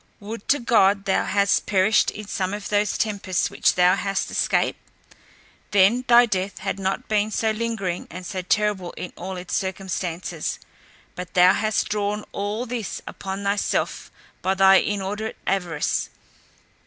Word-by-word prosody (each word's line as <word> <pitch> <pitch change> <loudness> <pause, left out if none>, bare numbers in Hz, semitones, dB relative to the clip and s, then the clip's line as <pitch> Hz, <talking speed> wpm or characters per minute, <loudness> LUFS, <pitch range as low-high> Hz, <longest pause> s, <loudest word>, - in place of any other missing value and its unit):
Would 210 +1 -8
to 290 - +4
God 205 -6 +3
thou 190 - +1
hadst 200 0 +2
perished 200 +2 +3
in 210 - -8
some 195 -1 -2
of 205 - -7
those 205 -1 +1
tempests 200 -4 -1
which - - +2
thou 180 0 +5
hast 195 -1 -2
escaped! - - +1 0.9
then 205 +6 +4
thy 240 0 +7
death 195 -3 -2
had 195 0 -3
not 190 0 -2
been 210 0 +1
so 220 0 0
lingering, 215 -5 -3
and 185 0 -8
so 185 +1 -4
terrible 195 -1 0
in 180 - -7
all 190 +1 -6
its 180 0 -4
circumstances. 185 -3 -3 0.6
But 180 -1 -8
thou 180 +1 +7
hast 215 0 0
drawn 210 0 -1
all 205 +4 -3
this 235 -3 -5
upon 195 +1 -6
thyself 200 +1 -1 0.3
by 190 +1 +1
thy 195 0 +7
inordinate 205 +2 -2
avarice. 175 -6 -1
200 Hz, 150 wpm, -23 LUFS, 190-210 Hz, 0.9 s, thy